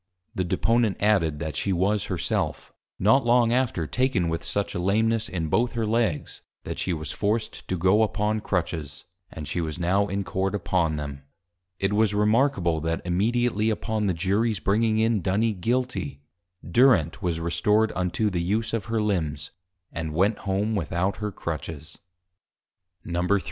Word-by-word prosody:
The 95 Hz, -, -1 dB
Deponent 115 Hz, +4 st, +1 dB
added, 95 Hz, -8 st, +2 dB
that 80 Hz, -2 st, -4 dB
she 100 Hz, -, -1 dB
was 95 Hz, +3 st, +1 dB
Her -, -, -3 dB
self, -, -, -2 dB, 0.2 s
not 110 Hz, +8 st, +4 dB
long 120 Hz, -1 st, +4 dB
after 120 Hz, -10 st, 0 dB
taken 120 Hz, -, +1 dB
with 80 Hz, 0 st, -3 dB
such 100 Hz, -1 st, -2 dB
a -, -, -3 dB
Lameness, 110 Hz, +4 st, +1 dB
in 85 Hz, -3 st, -2 dB
both 115 Hz, +9 st, +1 dB
her 115 Hz, -1 st, -1 dB
Legs, 110 Hz, -7 st, -1 dB, 0.2 s
that -, -, -5 dB
she 95 Hz, -, -1 dB
was 80 Hz, -4 st, -3 dB
forced 110 Hz, +2 st, -2 dB
to 95 Hz, -, -1 dB
go 95 Hz, +5 st, +4 dB
upon 110 Hz, 0 st, +1 dB
Crutches; 80 Hz, -7 st, -3 dB, 0.3 s
and 75 Hz, -2 st, -7 dB
she 85 Hz, +3 st, -2 dB
was 80 Hz, -2 st, -4 dB
now 95 Hz, +4 st, +1 dB
in 100 Hz, 0 st, -2 dB
Court 95 Hz, +1 st, -1 dB
upon 85 Hz, -4 st, 0 dB
them. 70 Hz, -2 st, -5 dB, 0.6 s
[It 95 Hz, +2 st, 0 dB
was 105 Hz, -1 st, +2 dB
Remarkable, 105 Hz, -, +2 dB
that 80 Hz, +1 st, -2 dB
immediately 110 Hz, +4 st, +1 dB
upon 110 Hz, -1 st, -1 dB
the 90 Hz, -, 0 dB
Juries 100 Hz, +5 st, +1 dB
bringing 110 Hz, +3 st, +2 dB
in 110 Hz, -2 st, +2 dB
Duny 105 Hz, +6 st, +1 dB
Guilty, 95 Hz, -, -2 dB, 0.4 s
Durent 100 Hz, -, +3 dB
was 85 Hz, -3 st, -1 dB
restored 95 Hz, +7 st, +2 dB
unto 95 Hz, +4 st, 0 dB
the 90 Hz, -2 st, -1 dB
use 105 Hz, +7 st, -1 dB
of 115 Hz, -3 st, -1 dB
her 110 Hz, -1 st, 0 dB
Limbs, 80 Hz, -9 st, -2 dB, 0.4 s
and 80 Hz, -2 st, -4 dB
went 100 Hz, +5 st, +2 dB
home 100 Hz, +3 st, -1 dB
without 90 Hz, +1 st, -1 dB
her 105 Hz, -1 st, -3 dB
Crutches.] 80 Hz, -3 st, -6 dB, 1.1 s
_III. 90 Hz, +3 st, +1 dB
100 Hz, 165 wpm, -25 LUFS, 85-110 Hz, 1.1 s, not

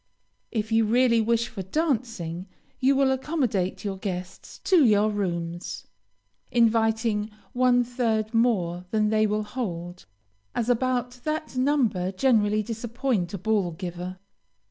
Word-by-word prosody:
If 220 Hz, -1 st, -2 dB
you 225 Hz, 0 st, +4 dB
really 235 Hz, +1 st, +4 dB
wish 230 Hz, +1 st, +1 dB
for 195 Hz, -, -6 dB
dancing, 215 Hz, -, -2 dB, 0.3 s
you 270 Hz, +1 st, +3 dB
will 270 Hz, -1 st, +3 dB
accommodate 255 Hz, -, -1 dB
your 195 Hz, -1 st, -2 dB
guests 185 Hz, -1 st, -6 dB
to 360 Hz, -5 st, +5 dB
your 215 Hz, -2 st, +4 dB
rooms, 175 Hz, -4 st, -3 dB, 0.7 s
inviting 225 Hz, -2 st, +2 dB, 0.2 s
one 245 Hz, 0 st, +4 dB
third 230 Hz, -3 st, -1 dB
more 185 Hz, -7 st, +1 dB
than 215 Hz, 0 st, +1 dB
they 215 Hz, 0 st, +3 dB
will 210 Hz, +1 st, 0 dB
hold, 180 Hz, -, -5 dB, 0.5 s
as 235 Hz, 0 st, -1 dB
about 250 Hz, 0 st, -1 dB
that 310 Hz, -2 st, -3 dB
number 255 Hz, -9 st, +1 dB
generally 215 Hz, -1 st, +2 dB
disappoint 230 Hz, -3 st, -2 dB
a -, -, -3 dB
ball 195 Hz, -3 st, 0 dB
giver. 180 Hz, +1 st, -6 dB
220 Hz, 125 wpm, -26 LUFS, 190-245 Hz, 0.7 s, to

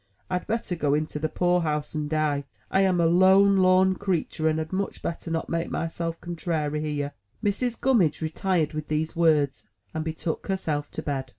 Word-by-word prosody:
I 180 Hz, -, +1 dB
had -, -, -18 dB
better 225 Hz, -5 st, -1 dB
go 145 Hz, -3 st, +1 dB
into 155 Hz, 0 st, -2 dB
the 155 Hz, +1 st, -1 dB
Poor 180 Hz, +1 st, +2 dB
house 150 Hz, -2 st, -2 dB
and 150 Hz, -1 st, -2 dB
die. 150 Hz, -2 st, 0 dB, 0.3 s
I 195 Hz, -, +4 dB
am 185 Hz, -2 st, +3 dB
a 170 Hz, -, +4 dB
lone 190 Hz, +3 st, +6 dB
lorn 185 Hz, 0 st, +5 dB
creetur, 175 Hz, -5 st, -1 dB
and 155 Hz, -, 0 dB
had 160 Hz, +2 st, -4 dB
much 195 Hz, +1 st, -3 dB
better 170 Hz, 0 st, -4 dB
not 165 Hz, 0 st, -2 dB
make 165 Hz, 0 st, -2 dB
myself 165 Hz, 0 st, -3 dB
contrairy 160 Hz, -3 st, -2 dB
here!" 145 Hz, -2 st, -2 dB, 0.3 s
Mrs. 225 Hz, +3 st, 0 dB
Gummidge 220 Hz, -, +3 dB
retired 160 Hz, 0 st, 0 dB
with 155 Hz, 0 st, -4 dB
these 155 Hz, +1 st, -1 dB
words, 155 Hz, -5 st, +2 dB, 0.3 s
and 160 Hz, -, -2 dB
betook 160 Hz, 0 st, -4 dB
herself 155 Hz, -7 st, -2 dB
to -, -, -5 dB
bed. 135 Hz, -3 st, -3 dB
165 Hz, 190 wpm, -26 LUFS, 155-185 Hz, 0.3 s, lone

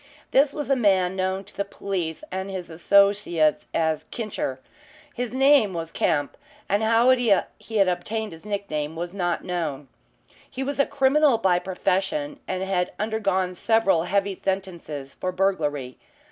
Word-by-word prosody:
This 275 Hz, +1 st, +4 dB
was 295 Hz, 0 st, -4 dB
a -, -, +5 dB
man 190 Hz, -6 st, +2 dB
known 190 Hz, +1 st, -1 dB
to -, -, -15 dB
the 200 Hz, -, -1 dB
police 195 Hz, -, -4 dB
and 190 Hz, +1 st, -3 dB
his 185 Hz, -3 st, -6 dB
associates 175 Hz, -3 st, +3 dB
as 160 Hz, -2 st, 0 dB
"Kincher." 205 Hz, -, -4 dB, 0.5 s
His 245 Hz, -3 st, -3 dB
name 265 Hz, -6 st, +4 dB
was 165 Hz, -1 st, -4 dB
Kemp, 145 Hz, -1 st, 0 dB, 0.3 s
and 205 Hz, +2 st, +1 dB
how 225 Hz, +2 st, +3 dB
he 245 Hz, -2 st, +2 dB
had 200 Hz, +1 st, +1 dB
obtained 210 Hz, +5 st, -2 dB
his 165 Hz, 0 st, -12 dB
nick 200 Hz, -1 st, -3 dB
name 150 Hz, +1 st, -2 dB
was 175 Hz, +2 st, -5 dB
not 175 Hz, -3 st, -1 dB
known. 155 Hz, -6 st, -3 dB, 0.6 s
He 265 Hz, 0 st, -4 dB
was 280 Hz, +1 st, -3 dB
a 280 Hz, -, +4 dB
criminal 280 Hz, -1 st, +3 dB
by 185 Hz, -5 st, +2 dB
profession 195 Hz, +11 st, -1 dB
and 185 Hz, -, -2 dB
had 185 Hz, -2 st, -1 dB
undergone 200 Hz, -4 st, 0 dB
several 195 Hz, -4 st, +2 dB
heavy 200 Hz, +1 st, 0 dB
sentences 175 Hz, -8 st, -4 dB
for 185 Hz, -, -3 dB
burglary. 150 Hz, -9 st, -1 dB
190 Hz, 155 wpm, -24 LUFS, 175-220 Hz, 0.6 s, a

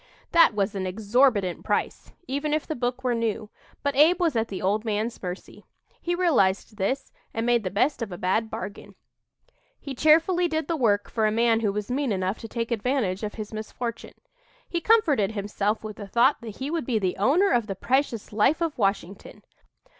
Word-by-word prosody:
That 335 Hz, -9 st, +5 dB
was 200 Hz, 0 st, 0 dB
an 190 Hz, -2 st, -3 dB
exorbitant 205 Hz, -1 st, +1 dB
price, -, -, -2 dB, 0.2 s
even 290 Hz, +3 st, -1 dB
if 310 Hz, -, -2 dB
the 315 Hz, -, -3 dB
book 245 Hz, -1 st, -3 dB
were 250 Hz, -1 st, +1 dB
new, 225 Hz, -2 st, -2 dB, 0.3 s
but 285 Hz, -1 st, 0 dB
Abe 320 Hz, +6 st, +5 dB
was 335 Hz, -6 st, +1 dB
at 225 Hz, 0 st, +1 dB
the 195 Hz, -, -5 dB
old 205 Hz, +3 st, 0 dB
man's 220 Hz, +1 st, -2 dB
mercy. 180 Hz, 0 st, -7 dB, 0.4 s
He 350 Hz, 0 st, -1 dB
realized 225 Hz, -, +1 dB
this, 260 Hz, +7 st, -2 dB, 0.2 s
and 225 Hz, +1 st, -1 dB
made 240 Hz, -2 st, +2 dB
the 185 Hz, -, -2 dB
best 250 Hz, +9 st, 0 dB
of 225 Hz, -4 st, -4 dB
a 175 Hz, -, -6 dB
bad 210 Hz, +4 st, 0 dB
bargain. 205 Hz, -2 st, -7 dB, 0.8 s
He 280 Hz, -, -6 dB
cheerfully 330 Hz, +6 st, +4 dB
did 315 Hz, -1 st, -2 dB
the 335 Hz, -, 0 dB
work 210 Hz, -8 st, +1 dB
for 220 Hz, -2 st, 0 dB
a -, -, +1 dB
man 230 Hz, 0 st, +3 dB
who 215 Hz, -3 st, 0 dB
was 210 Hz, +3 st, -4 dB
mean 270 Hz, -1 st, 0 dB
enough 190 Hz, +1 st, -1 dB
to 225 Hz, -, -7 dB
take 230 Hz, +1 st, -4 dB
advantage 225 Hz, -4 st, 0 dB
of 210 Hz, -1 st, -4 dB
his 215 Hz, -1 st, -7 dB
misfortune. 230 Hz, +2 st, -6 dB, 0.5 s
He 340 Hz, -, -2 dB
comforted 310 Hz, -, +3 dB
himself 205 Hz, +1 st, -2 dB
with 215 Hz, -1 st, -7 dB
the 205 Hz, -, -7 dB
thought 240 Hz, +8 st, +3 dB
that 220 Hz, -3 st, -8 dB
he 270 Hz, +3 st, -4 dB
would 330 Hz, -7 st, -2 dB
be 240 Hz, -4 st, +1 dB
the 185 Hz, -4 st, -1 dB
owner 305 Hz, -, +3 dB
of 235 Hz, -3 st, +1 dB
the 195 Hz, -, -4 dB
precious 245 Hz, -1 st, -1 dB
"Life 225 Hz, +9 st, +3 dB
of 330 Hz, -6 st, -2 dB
Washington." 195 Hz, -2 st, -2 dB
230 Hz, 200 wpm, -25 LUFS, 205-275 Hz, 0.8 s, That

